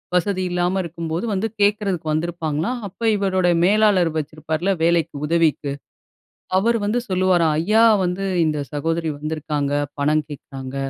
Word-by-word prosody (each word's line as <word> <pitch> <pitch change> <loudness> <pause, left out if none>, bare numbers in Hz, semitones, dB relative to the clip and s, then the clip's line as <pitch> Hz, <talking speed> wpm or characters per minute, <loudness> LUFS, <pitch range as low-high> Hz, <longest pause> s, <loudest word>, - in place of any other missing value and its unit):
வசதி 185 +1 +1
இல்லாம 180 +2 0
இருக்கும்போது 165 +2 -4
வந்து 200 +3 0
கேட்கறதுக்கு 200 -5 +1
வந்திருப்பாங்களாம். 165 +6 -2
அப்ப 190 +4 -17
இவருடைய 185 -3 +1
மேலாளர் 200 -3 +4
வச்சிருப்பார்ல, 155 +4 -2
வேலைக்கு, 165 -2 +1
உதவிக்கு. 155 -3 +1 0.9
அவரு 230 +4 +2
வந்து 220 +4 +1
சொல்லுவாராம், 180 -4 +2
ஐயா! 220 +5 +4 0.2
வந்து 180 +2 -2 0.2
இந்த 150 -1 0
சகோதரி 165 +2 -1
வந்திருக்காங்க, 150 -2 -3 0.3
பணம் 150 +1 +2
கேட்குறாங்க. 135 -2 -8
170 Hz, 120 wpm, -21 LUFS, 155-190 Hz, 0.9 s, மேலாளர்